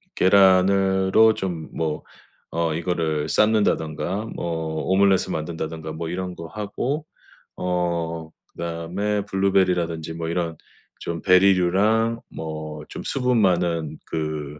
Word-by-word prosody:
계란으로 95 Hz, +2 st, +5 dB
좀 85 Hz, -4 st, -4 dB
뭐 80 Hz, -2 st, -2 dB, 0.5 s
어 85 Hz, -2 st, 0 dB
이거를 80 Hz, -3 st, -1 dB
삶는다든가 100 Hz, -2 st, +1 dB
뭐 80 Hz, -2 st, -3 dB
오므라이스 95 Hz, -1 st, +3 dB
만든다든가 80 Hz, 0 st, -4 dB
뭐 80 Hz, +1 st, -5 dB
이런 90 Hz, +1 st, -4 dB
거 85 Hz, -, -8 dB
하고 110 Hz, -, -3 dB, 0.5 s
어 85 Hz, -2 st, -2 dB, 0.2 s
그다음에 90 Hz, +5 st, -3 dB
블루베리라든지 90 Hz, -5 st, +1 dB
뭐 80 Hz, 0 st, -4 dB
이런 85 Hz, -1 st, -2 dB, 0.4 s
좀 85 Hz, -1 st, -4 dB
베리류랑 100 Hz, +5 st, +3 dB
뭐 80 Hz, -1 st, -6 dB
좀 -, -, -7 dB
수분 125 Hz, -3 st, +1 dB
많은 85 Hz, -4 st, +1 dB
그 75 Hz, -2 st, -4 dB
85 Hz, 245 characters per minute, -23 LUFS, 80-95 Hz, 0.5 s, 계란으로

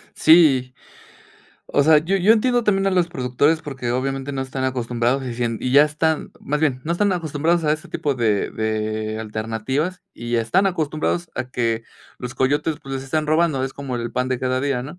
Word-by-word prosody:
Sí, 135 Hz, -6 st, +5 dB, 0.9 s
o 145 Hz, -, +2 dB
sea, 155 Hz, +1 st, +6 dB
yo 180 Hz, +6 st, 0 dB
yo 195 Hz, +4 st, +5 dB
entiendo 240 Hz, +1 st, +2 dB
también 195 Hz, -2 st, +2 dB
a -, -, +3 dB
los 180 Hz, -2 st, +2 dB
productores 145 Hz, +4 st, +1 dB
porque, 130 Hz, -4 st, -4 dB
obviamente, 135 Hz, +2 st, -2 dB
no 135 Hz, -1 st, -2 dB
están 130 Hz, 0 st, -4 dB
acostumbrados 125 Hz, +1 st, -1 dB
y 120 Hz, -2 st, -4 dB
sien 115 Hz, -2 st, -2 dB
y 125 Hz, -, -2 dB
ya 145 Hz, +2 st, +7 dB
están, 155 Hz, +1 st, -1 dB
más 150 Hz, +2 st, -2 dB
bien, 135 Hz, -5 st, +1 dB
no 170 Hz, -, -1 dB
están 200 Hz, +2 st, +1 dB
acostumbrados 165 Hz, 0 st, 0 dB
a 150 Hz, -, +3 dB
ese 155 Hz, -, -5 dB
tipo 145 Hz, -2 st, -1 dB
de 110 Hz, -5 st, 0 dB
de 110 Hz, 0 st, -2 dB
alternativas, 115 Hz, -, -3 dB
y 120 Hz, 0 st, -3 dB
están 175 Hz, -, +2 dB
acostumbrados 165 Hz, 0 st, -1 dB
a 130 Hz, -, -4 dB
que 115 Hz, -2 st, -1 dB, 0.3 s
los 125 Hz, -1 st, -6 dB
coyotes, 145 Hz, +4 st, 0 dB
pues, 135 Hz, 0 st, -7 dB
les 135 Hz, 0 st, -4 dB
están 155 Hz, +3 st, -1 dB
robando, 155 Hz, -3 st, +2 dB
es 135 Hz, -, -5 dB
como 135 Hz, -3 st, -5 dB
el 120 Hz, 0 st, -4 dB
pan 125 Hz, 0 st, -1 dB
de 130 Hz, -1 st, -1 dB
cada 130 Hz, 0 st, -1 dB
día, 135 Hz, -3 st, -1 dB
¿no? 150 Hz, +7 st, -9 dB
135 Hz, 200 wpm, -21 LUFS, 125-160 Hz, 0.9 s, ya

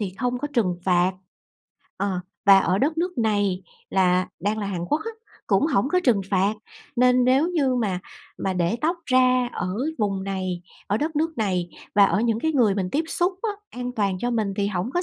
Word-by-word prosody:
thì 190 Hz, -3 st, -3 dB
không 250 Hz, -1 st, -1 dB
có 295 Hz, -, -3 dB
trừng 185 Hz, -7 st, +1 dB
phạt, 180 Hz, 0 st, +3 dB, 0.8 s
ờ, 190 Hz, -2 st, -1 dB, 0.3 s
và 195 Hz, -1 st, +9 dB
ở 185 Hz, +1 st, +1 dB
đất 310 Hz, +4 st, 0 dB
nước 355 Hz, -5 st, -2 dB
này 205 Hz, -4 st, +1 dB, 0.3 s
là 185 Hz, -1 st, +2 dB
đang 210 Hz, +3 st, -1 dB
là 205 Hz, -, -2 dB
Hàn 175 Hz, -3 st, -3 dB
Quốc 300 Hz, -, 0 dB
á, 455 Hz, -, -3 dB, 0.4 s
cũng 200 Hz, +8 st, +3 dB
hổng 265 Hz, -4 st, +1 dB
có 365 Hz, +3 st, +2 dB
trừng 225 Hz, -6 st, +4 dB
phạt, 195 Hz, +2 st, +2 dB, 0.4 s
nên 250 Hz, 0 st, +4 dB
nếu 270 Hz, +6 st, +3 dB
như 280 Hz, -7 st, +1 dB
mà 200 Hz, -7 st, -1 dB, 0.4 s
mà 190 Hz, -, -1 dB
để 180 Hz, +4 st, 0 dB
tóc 335 Hz, +3 st, +1 dB
ra 255 Hz, -1 st, +3 dB
ở 185 Hz, +1 st, -3 dB, 0.2 s
vùng 195 Hz, -2 st, -1 dB
này, 185 Hz, -2 st, -3 dB, 0.2 s
ở 205 Hz, -, +1 dB
đất 310 Hz, +3 st, -2 dB
nước 320 Hz, -3 st, -1 dB
này 180 Hz, -5 st, -1 dB, 0.2 s
và 200 Hz, -1 st, +7 dB
ở 200 Hz, -, +2 dB
những 230 Hz, -1 st, +1 dB
cái 320 Hz, 0 st, 0 dB
người 230 Hz, -8 st, +3 dB
mình 185 Hz, -2 st, -2 dB
tiếp 315 Hz, +3 st, 0 dB
xúc 355 Hz, +2 st, +1 dB
á, 445 Hz, -, 0 dB, 0.2 s
an 250 Hz, 0 st, -5 dB
toàn 200 Hz, -5 st, 0 dB
cho 245 Hz, +4 st, -1 dB
mình 215 Hz, -4 st, -1 dB
thì 200 Hz, -1 st, +1 dB
hổng 200 Hz, +4 st, -2 dB
có 355 Hz, -, +1 dB
210 Hz, 210 wpm, -24 LUFS, 190-255 Hz, 0.8 s, và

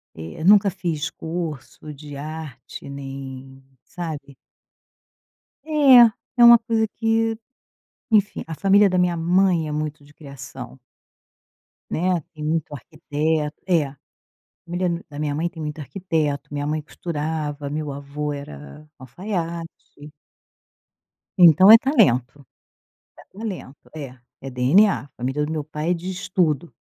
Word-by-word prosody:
Eh, 80 Hz, -, -8 dB
nunca 200 Hz, +1 st, +6 dB
fiz 170 Hz, -4 st, -3 dB
curso 160 Hz, -2 st, -6 dB
de 145 Hz, 0 st, -10 dB
arte 145 Hz, -3 st, -8 dB
nem 135 Hz, -1 st, -8 dB, 0.2 s
sabe. 150 Hz, -5 st, -7 dB, 1.3 s
É. 265 Hz, -7 st, +7 dB, 0.2 s
É 240 Hz, -, +6 dB
uma 235 Hz, 0 st, +10 dB
coisa 225 Hz, -1 st, 0 dB
que 225 Hz, 0 st, +1 dB, 0.7 s
enfim. 210 Hz, -2 st, +2 dB
A 160 Hz, -, -6 dB
família 200 Hz, +4 st, +4 dB
da 185 Hz, -1 st, 0 dB
minha 180 Hz, -1 st, +2 dB
mãe 175 Hz, 0 st, +2 dB
é -, -, -4 dB
muito 150 Hz, -1 st, -4 dB
de 145 Hz, -, -19 dB
criação. 135 Hz, -3 st, -10 dB, 1.1 s
Né. 180 Hz, +1 st, 0 dB
Tem 155 Hz, -, -9 dB
muito 155 Hz, -1 st, -1 dB
arquiteto 150 Hz, +1 st, -3 dB
é. 170 Hz, -5 st, +3 dB
A 135 Hz, +1 st, -12 dB, 0.7 s
família 175 Hz, +1 st, -2 dB
d 170 Hz, 0 st, -3 dB
da 145 Hz, -, -9 dB
minha 150 Hz, -1 st, -2 dB
mãe 165 Hz, +4 st, -1 dB
tem 170 Hz, -2 st, -12 dB
muito 150 Hz, 0 st, -5 dB
arquiteto, 150 Hz, -3 st, -2 dB
minha 145 Hz, 0 st, -3 dB
mãe 155 Hz, +1 st, -1 dB
costurava, 150 Hz, -2 st, -4 dB
meu 150 Hz, 0 st, -4 dB
avô 145 Hz, +1 st, -5 dB
era 75 Hz, -, -10 dB
alfaiate. 170 Hz, -, -5 dB, 1.7 s
Então 175 Hz, +2 st, +8 dB
é 225 Hz, -, +13 dB
talento. 135 Hz, -, +1 dB, 0.7 s
É 195 Hz, -, -17 dB
talento. 190 Hz, -, -8 dB
É, 135 Hz, -4 st, -8 dB, 0.2 s
é 135 Hz, -, -7 dB
DNA. 130 Hz, -, +3 dB
A -, -, -17 dB
família 135 Hz, +4 st, -2 dB
do 155 Hz, -, -4 dB
meu 155 Hz, -2 st, -3 dB
pai 155 Hz, +2 st, -4 dB
é -, -, +3 dB
de 175 Hz, +2 st, -5 dB
estudo, 175 Hz, -4 st, -1 dB
155 Hz, 135 wpm, -22 LUFS, 145-180 Hz, 1.7 s, é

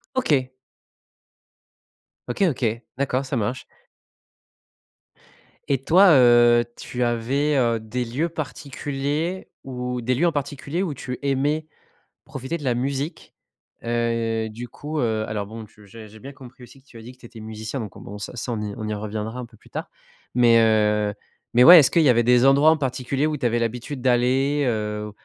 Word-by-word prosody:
OK. 140 Hz, -, +1 dB, 1.8 s
OK. 120 Hz, +11 st, -1 dB
OK. 130 Hz, -4 st, -2 dB, 0.3 s
D'accord. 135 Hz, 0 st, -1 dB
Ça 135 Hz, -1 st, -3 dB
marche. 115 Hz, +4 st, -3 dB, 2.0 s
Et 135 Hz, -2 st, +2 dB
toi, 185 Hz, +5 st, +6 dB
heu, 120 Hz, -2 st, +6 dB
tu 125 Hz, 0 st, -4 dB
avais, 130 Hz, +5 st, 0 dB
heu, 115 Hz, -3 st, +2 dB
des 120 Hz, +3 st, -4 dB
lieux 135 Hz, +9 st, -2 dB
particuliers 145 Hz, +3 st, -4 dB, 0.2 s
où 125 Hz, -1 st, -4 dB
des 125 Hz, +2 st, 0 dB
lieux 165 Hz, -, +1 dB
en 170 Hz, -, +2 dB
particulier 145 Hz, +3 st, -4 dB
où 170 Hz, -7 st, -2 dB
tu 125 Hz, -1 st, -7 dB
aimais 145 Hz, +3 st, 0 dB, 0.6 s
profiter 135 Hz, +5 st, -5 dB
de 150 Hz, -, -10 dB
la 125 Hz, -3 st, 0 dB
musique? 135 Hz, +5 st, -4 dB, 0.5 s
Heu, 115 Hz, -1 st, -1 dB
du 115 Hz, +3 st, -8 dB
coup, 150 Hz, +5 st, -5 dB
heu, 110 Hz, -2 st, 0 dB
alors, 105 Hz, -1 st, -3 dB
bon, 110 Hz, +2 st, -9 dB
tu 105 Hz, 0 st, -19 dB
j'ai 110 Hz, +2 st, -11 dB
j'ai 110 Hz, +1 st, -15 dB
bien 135 Hz, +4 st, -9 dB
compris 130 Hz, -2 st, -14 dB
aussi 125 Hz, +3 st, -15 dB
que 135 Hz, -, -34 dB
tu 120 Hz, -, -14 dB
as -, -, -11 dB
dit 120 Hz, -, -10 dB
que 125 Hz, -, -23 dB
tu 120 Hz, -, -13 dB
étais 115 Hz, -1 st, -13 dB
musicien. 110 Hz, +4 st, -6 dB
Donc, 105 Hz, -4 st, -8 dB
bon, 100 Hz, -, -9 dB
ça, 105 Hz, -, -8 dB
ça 120 Hz, +1 st, -4 dB
on 110 Hz, -, -3 dB
y 105 Hz, -, -4 dB
on 110 Hz, -, -5 dB
y 105 Hz, -, -2 dB
reviendra 110 Hz, +3 st, -5 dB
un -, -, -6 dB
peu 115 Hz, -1 st, -20 dB
plus -, -, -22 dB
tard. -, -, -6 dB, 0.5 s
Mais, 120 Hz, -2 st, +5 dB
heu, 105 Hz, -2 st, +2 dB, 0.4 s
mais, 125 Hz, +1 st, +6 dB
ouais, 175 Hz, +2 st, +11 dB
est-ce 140 Hz, -, +3 dB
qu'il 170 Hz, -, +3 dB
y 150 Hz, -, +4 dB
avait 120 Hz, -1 st, +4 dB
des 125 Hz, +2 st, +4 dB
endroits 140 Hz, +3 st, +6 dB
en 160 Hz, -, +3 dB
particulier 135 Hz, +1 st, -1 dB
où 155 Hz, -1 st, -1 dB
tu 135 Hz, -, -6 dB
avais 120 Hz, 0 st, +1 dB
l'habitude 120 Hz, +4 st, -4 dB
d'aller? 130 Hz, +3 st, +2 dB
Heu, 105 Hz, -1 st, -3 dB
125 Hz, 185 wpm, -23 LUFS, 115-140 Hz, 2.0 s, ouais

